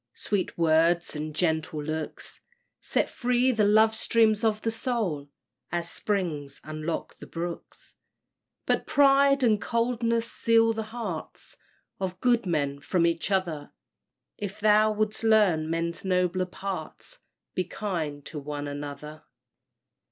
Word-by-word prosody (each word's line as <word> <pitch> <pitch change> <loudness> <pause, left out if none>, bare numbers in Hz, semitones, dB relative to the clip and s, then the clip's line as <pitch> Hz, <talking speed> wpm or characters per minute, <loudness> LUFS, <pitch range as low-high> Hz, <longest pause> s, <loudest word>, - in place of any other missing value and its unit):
Sweet 205 -3 -2
words 165 +1 +3
and 150 0 -4
gentle 160 -3 0
looks 155 +1 -5 0.4
Set - - 0
free 250 +1 +1
the 220 -4 +2
love 220 +1 +5
streams 220 -1 +2
of 215 -1 +1
the 225 - +1
soul, 215 - -2 0.4
As 170 -1 -2
springs 160 -9 -2
unlock 155 +1 -4
the - - -11
brooks; 170 0 -7 0.7
But - - 0
pride 275 -1 +5
and 215 -4 +3
coldness 230 +1 0
seal 225 0 +3
the 220 - -3
hearts 220 -9 -6 0.4
Of 185 -1 -3
good 240 -3 +2
men 140 -4 0
from 170 +4 +1
each 170 +2 0
other. 175 -7 -1 0.7
If 200 -2 -5
thou 215 0 +5
wouldst 215 +1 -1
learn 200 -8 +4
men's 165 +1 -2
nobler 185 -1 +1
parts 195 - -6 0.3
Be 185 - 0
kind 160 -8 -4
to 155 - -6
one 145 0 -5
another! 145 +1 -7
185 Hz, 130 wpm, -27 LUFS, 160-220 Hz, 0.7 s, love